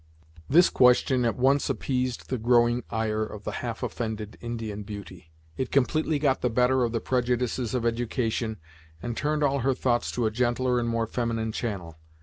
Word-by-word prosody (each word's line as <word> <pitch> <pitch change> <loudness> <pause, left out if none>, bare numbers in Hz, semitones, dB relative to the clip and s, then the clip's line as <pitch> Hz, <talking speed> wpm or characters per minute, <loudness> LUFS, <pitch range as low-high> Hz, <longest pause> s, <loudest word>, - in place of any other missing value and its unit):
This 170 +5 +6
question 125 0 +4
at 115 - +1
once 135 +3 +3
appeased 125 -2 -2
the 130 - -1
growing 120 +1 +3
ire 110 -1 -1
of 105 -1 -5
the - - -3
half - - -4
offended 110 -2 -4
Indian 115 -3 -5
beauty. 95 -5 -9 0.3
It 130 - -2
completely 155 +3 +2
got 140 -2 +1
the 125 - +1
better 125 +2 +3
of 120 - 0
the 115 - -1
prejudices 125 -1 -1
of 120 -2 -1
education, 115 -1 -1 0.5
and 120 -1 -3
turned 150 +2 0
all 140 -1 +2
her 130 +1 +1
thoughts 120 -2 0
to 120 - 0
a 110 - +1
gentler 125 +2 +1
and 120 -1 -1
more 115 0 0
feminine 115 -1 -2
channel. 90 -9 -5
120 Hz, 175 wpm, -27 LUFS, 110-130 Hz, 0.5 s, This